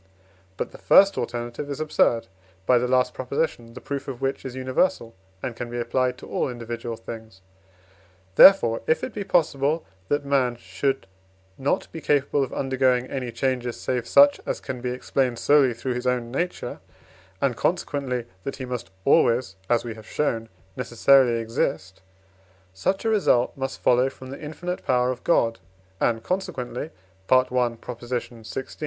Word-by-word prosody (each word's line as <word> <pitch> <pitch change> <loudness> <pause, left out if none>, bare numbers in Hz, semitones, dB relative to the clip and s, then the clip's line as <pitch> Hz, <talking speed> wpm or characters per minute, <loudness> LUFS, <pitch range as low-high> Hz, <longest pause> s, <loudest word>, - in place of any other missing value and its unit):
But - - -3
the - - -13
first 195 0 +6
alternative 120 +3 -4
is 140 - -4
absurd 135 -6 +2 0.4
(by 125 +3 +5
the 125 - 0
last 125 0 +2
Prop., 130 -1 -7
the 120 -5 -2
proof 140 0 -4
of 130 -3 -5
which 135 0 -2
is 130 -1 -6
universal, 130 -1 0 0.3
and 125 -3 -3
can 120 +1 -5
be 120 0 -4
applied 125 +1 0
to - - -11
all - - -1
individual 120 -1 -5
things). 110 -3 -10 0.9
Therefore, 115 - +7
if 160 - +2
it - - -4
be 205 - -3
possible, 155 -3 +1 0.2
that 145 0 0
man 135 -3 +2
should 120 +5 -2 0.5
not 135 +1 -1
be 160 - -7
capable 145 -1 +2
of 130 - -5
undergoing 130 -2 +1
any 125 -3 -3
changes, 125 0 -2
save 125 -2 -2
such 285 0 +6
as - - -3
can 125 -2 -6
be 125 - -2
explained 125 0 -1
solely 145 -1 +4
through 120 +2 -3
his 125 +1 -3
own 120 -2 0
nature, 175 +7 -3 0.6
and - - +1
consequently 125 -4 -1 0.2
that 135 - -4
he 130 - -6
must 125 -6 -5 0.2
always 115 -5 +3
(as 120 -1 +3
we 120 -2 -5
have 110 -1 -13
shown) 115 -6 -1 0.3
necessarily 125 0 +4
exist; 110 -4 -2 0.7
such 190 - -1
a - - +3
result 190 - +2
must 135 0 -4
follow 125 +2 +3
from 130 0 -11
the 140 - -8
infinite 175 +4 -5
power 125 0 +2
of 125 - -7
God, 115 -9 +2 0.4
and 115 -1 +1
consequently 145 -5 -3 0.4
(I. - - +5
xvi.) 120 -1 -3
125 Hz, 160 wpm, -24 LUFS, 120-140 Hz, 0.9 s, Therefore